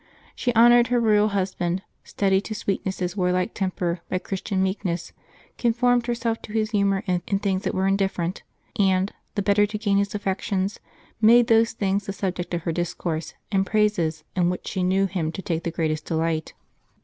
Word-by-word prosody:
She 245 - 0
honored 240 +1 +7
her 245 -1 +2
royal 215 -2 +4
husband, 185 -2 -1 0.2
studied 195 -1 +1
to 215 - -4
sweeten 195 -2 -2
his 180 -1 -4
warlike 180 +1 0
temper 180 -3 -2
by 185 - 0
Christian 190 +1 -2
meekness, 190 -3 -2 0.5
conformed 245 0 +2
herself 230 -1 -1
to 210 - -10
his 220 0 0
humor 200 -2 +1
in 180 -2 +1
things 195 +1 -1
that - - -1
were 190 - +1
indifferent, 195 -2 0 0.4
and, 190 0 +2 0.2
the 205 - 0
better 205 +1 +3
to 210 +1 -4
gain 205 -2 +1
his 200 +1 -1
affections, 195 0 -2 0.4
made 235 +2 +7
those 225 -1 +3
things 200 -2 -1
the 195 - -3
subject 180 -3 -3
of 170 - -4
her 170 - -1
discourse 170 -1 -3 0.2
and 195 -2 +3
praises 175 -8 +1
in 175 -1 +2
which 180 - -4
she 190 - -2
knew 190 +2 +2
him 175 -4 -2
to 190 - -5
take 165 -1 -2
the - - 0
greatest 155 -2 -2
de 165 - -2
light. 160 -1 -1
195 Hz, 185 wpm, -24 LUFS, 180-210 Hz, 0.5 s, honored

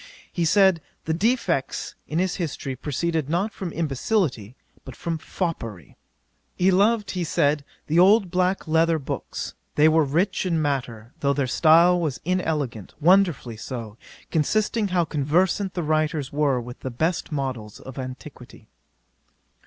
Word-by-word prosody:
He 170 - 0
said, 190 -1 +4 0.2
the 160 - 0
defects 185 - 0
in 155 - -3
his 185 +1 0
history 150 -6 -4
proceeded 155 +2 -2
not 190 +6 0
from 185 -3 -5
imbecility, 145 - -1 0.3
but 130 - -10
from 165 -1 -3
foppery. 115 - -5 0.6
'He 185 +1 +3
loved, 205 +3 +2
he 180 -2 -2
said, 145 -2 +1 0.2
the 160 +3 +2
old 195 0 +5
black 185 0 0
letter 165 +1 +3
books; 140 - -5 0.2
they 150 +1 +5
were 160 0 +4
rich 170 +8 0
in 170 -4 0
matter, 125 -5 -3
though 140 -2 +2
their 140 -1 0
style 170 +6 +5
was 155 -7 -2
inelegant; 155 - -2
wonderfully 165 - +3
so, 115 -3 -6 0.4
considering 210 +7 +1
how 180 -3 +1
conversant 175 +6 0
the 175 - -1
writers 155 -2 0
were 145 -3 +2
with 120 +1 -9
the 130 - -5
best 160 +8 -1
models 130 -7 -4
of 130 +1 -9
antiquity. 130 0 -9
160 Hz, 145 wpm, -24 LUFS, 135-180 Hz, 0.6 s, old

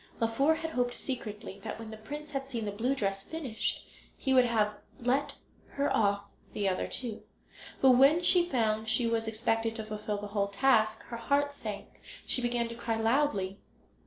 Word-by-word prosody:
Laufer 250 +8 +3
had 325 0 -4
hoped 245 -3 0
secretly 210 -6 -5
that - - -5
when 225 -1 -8
the - - -6
prince 295 +7 -8
had 270 -1 -3
seen 230 -4 -3
the 205 - -2
blue 240 +7 0
dress 195 -5 -1
finished 270 -8 -3 0.3
he 265 - 0
would 255 -1 +6
have 215 -3 +2 0.3
let 265 +4 0 0.4
her 280 +1 +1
off 200 -1 +2 0.3
the 205 -1 0
other 185 -1 0
two; 235 -4 -4 0.6
but 265 - +7
when 275 +6 +6
she 350 0 +4
found 220 -4 +1
she 240 +2 +2
was 230 -1 0
expected 225 0 0
to 220 -2 -5
fulfil 210 -1 -3
the 205 0 -6
whole 200 -1 0
task, 215 +1 +2
her 235 - -7
heart 285 +4 +1
sank 210 -7 -6
and - - -27 0.2
she 255 - +2
began 240 -1 0
to 230 - -6
cry 230 -1 -2
loudly. 225 -5 +1
230 Hz, 190 wpm, -30 LUFS, 215-270 Hz, 0.6 s, but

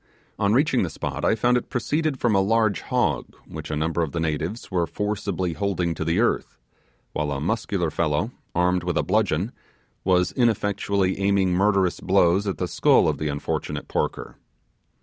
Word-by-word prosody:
On 100 -1 +2
reaching 135 +2 +3
the 90 - -1
spot 80 - -5
I - - +3
found 120 +3 +3
it 125 - -4
proceeded 150 +3 -1
from 120 -3 +2
a 95 - +4
large 110 -1 +2
hog - - -1
which - - -8
a 75 - -2
number 80 +3 0
of 80 -1 -3
natives 80 +7 -2
were 85 -2 +1
forcibly 100 -4 -2
holding 90 -1 -1
to 80 - -4
the 85 +4 +1
earth, 120 - 0 0.6
while 75 -1 -1
a 70 - -2
muscular 90 -1 -1
fellow, 85 +8 0 0.2
armed 90 +1 +2
with 90 -1 -1
a - - +2
bludgeon, 105 -1 +1 0.5
was 90 -1 +2
ineffectually 100 -4 +1
aiming 100 -1 +2
murderous 95 -1 +2
blows 95 +1 +3
at 95 - -2
the 90 - -2
skull - - +4
of - - -1
the 75 - -1
unfortunate 70 0 -3
porker. - - -3
95 Hz, 170 wpm, -24 LUFS, 85-105 Hz, 0.6 s, a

